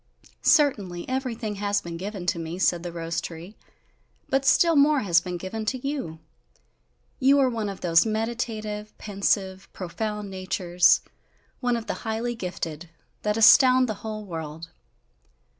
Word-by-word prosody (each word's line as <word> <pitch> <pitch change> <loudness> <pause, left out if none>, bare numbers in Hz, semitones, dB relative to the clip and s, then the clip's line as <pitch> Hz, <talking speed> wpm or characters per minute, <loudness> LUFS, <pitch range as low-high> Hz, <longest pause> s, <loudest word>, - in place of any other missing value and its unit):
"Certainly, 200 - +2
everything 240 -5 -3
has 205 0 0
been 170 -1 -7
given 190 +1 -6
to 170 -1 0
me," 165 +1 -5
said 175 -2 +2
the 175 0 -6
rose 165 0 -3
tree, 170 +5 -9 0.7
"but 270 0 +1
still 335 +4 +4
more 290 0 +4
has 175 -5 +3
been 180 -1 -5
given 190 +5 -5
to 255 +4 -2
you. 265 - -4 1.0
You 275 +1 +5
are 265 -2 +3
one 220 -3 -2
of 195 - -8
those 165 -2 +4
meditative, 215 -1 -3
pensive, 195 -2 -1
profound 210 +2 -4
natures, 185 -2 +2 0.6
one 245 -2 0
of 225 - -6
the - - -2
highly 225 +2 -2
gifted, 175 -6 -6 0.3
that 210 +1 0
astound 255 +3 +7
the 220 - -2
whole 215 -1 -5
world!" 160 -2 -7
210 Hz, 145 wpm, -25 LUFS, 175-235 Hz, 1.0 s, astound